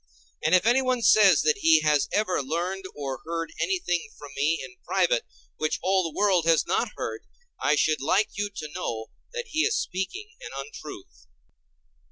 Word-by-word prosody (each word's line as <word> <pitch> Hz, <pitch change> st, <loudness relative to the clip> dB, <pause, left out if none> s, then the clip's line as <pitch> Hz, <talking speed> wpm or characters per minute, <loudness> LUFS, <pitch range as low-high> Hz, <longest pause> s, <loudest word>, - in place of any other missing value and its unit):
And 160 Hz, +3 st, +4 dB
if 185 Hz, -, +3 dB
anyone 255 Hz, 0 st, +2 dB
says 195 Hz, -11 st, +6 dB
that 155 Hz, +5 st, +2 dB
he 160 Hz, -4 st, +5 dB
has 150 Hz, -2 st, +2 dB
ever 205 Hz, -7 st, +1 dB
learned 175 Hz, +7 st, -3 dB
or 135 Hz, -2 st, -5 dB
heard 165 Hz, 0 st, -4 dB
anything 260 Hz, -, -1 dB
from 145 Hz, -1 st, -11 dB
me 150 Hz, +4 st, +1 dB
in 125 Hz, -1 st, -14 dB
private -, -, +1 dB, 0.3 s
which 155 Hz, 0 st, -1 dB
all 190 Hz, 0 st, +3 dB
the 165 Hz, -3 st, -5 dB
world 190 Hz, -5 st, +3 dB
has 165 Hz, -1 st, +4 dB
not -, -, 0 dB
heard, -, -, -5 dB, 0.3 s
I 150 Hz, -, +3 dB
should 155 Hz, 0 st, +1 dB
like 185 Hz, +9 st, +2 dB
you 205 Hz, 0 st, -2 dB
to 185 Hz, -6 st, -7 dB
know 115 Hz, -11 st, -4 dB, 0.2 s
that 480 Hz, 0 st, -5 dB
he 315 Hz, -, -2 dB
is 435 Hz, +6 st, +2 dB
speaking 365 Hz, -, -4 dB
an -, -, -7 dB
untruth. 135 Hz, -, -9 dB
170 Hz, 175 wpm, -26 LUFS, 150-205 Hz, 0.3 s, says